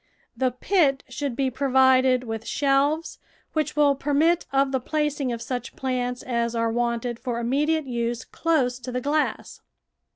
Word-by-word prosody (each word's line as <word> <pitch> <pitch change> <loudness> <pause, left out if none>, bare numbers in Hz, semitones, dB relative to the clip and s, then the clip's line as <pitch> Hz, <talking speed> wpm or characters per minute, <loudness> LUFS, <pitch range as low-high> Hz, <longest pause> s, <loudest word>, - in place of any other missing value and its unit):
The 260 -1 +1
pit 275 +1 +1
should 265 0 -3
be 265 0 0
provided 260 -1 +3
with 225 -1 -5
shelves, 285 +3 +1 0.3
which 305 -1 -1
will 295 -1 +4
permit 295 +5 +1
of 275 0 +2
the 265 - +1
placing 295 -1 -1
of 230 -1 -4
such 250 -2 -5
plants 250 -1 -2
as 235 -1 -1
are 230 0 +1
wanted 235 0 -1
for 245 -3 -3
immediate 295 +6 +1
use 240 -1 -2
close 265 -7 0
to 250 0 -7
the 250 - -1
glass. 295 +3 -1
260 Hz, 155 wpm, -24 LUFS, 245-285 Hz, 0.3 s, will